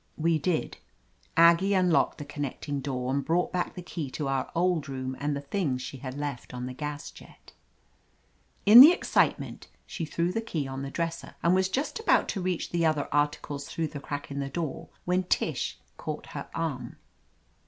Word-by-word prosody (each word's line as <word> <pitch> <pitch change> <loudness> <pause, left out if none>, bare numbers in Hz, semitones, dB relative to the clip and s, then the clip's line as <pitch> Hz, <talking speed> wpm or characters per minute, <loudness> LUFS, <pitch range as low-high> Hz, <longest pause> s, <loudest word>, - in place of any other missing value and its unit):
We 165 0 +2
did. 170 +1 -1 0.6
Aggie 170 +4 +6
unlocked 180 -3 +3
the 145 - -7
connecting 145 0 -4
door 130 -1 -2
and 140 0 0
brought 170 +7 0
back 180 -1 -1
the 180 - -7
key 165 -5 -5
to 145 +2 -3
our 135 -1 -1
old 170 -4 +1
room 130 -1 -4
and 145 0 -1
the 140 - -4
things 140 -4 -1
she 135 - -6
had 130 +1 -7
left 140 -4 -5
on 125 0 -4
the 125 - -5
gas 145 +2 -5
jet. - - -16 1.1
In 220 +5 +12
the 300 +5 +11
excitement - - 0 0.2
she 165 - -4
threw 170 +3 -1
the 225 - -1
key 160 -11 -3
on 135 0 -5
the 135 - -4
dresser 165 +3 -4
and 170 - +4
was 190 0 +2
just 275 - -2
about 450 - +3
to 195 - -2
reach 180 -2 -2
the 170 -1 +1
other 155 -3 +2
articles 145 -1 -1
through 160 -2 -2
the 145 -1 -7
crack 145 0 -6
in 140 - -3
the 140 0 -2
door 155 -1 -4 0.2
when 180 +1 +2
Tish 180 - -1 0.2
caught - - -5
her - - -6
arm. - - -3
150 Hz, 190 wpm, -28 LUFS, 140-175 Hz, 1.1 s, In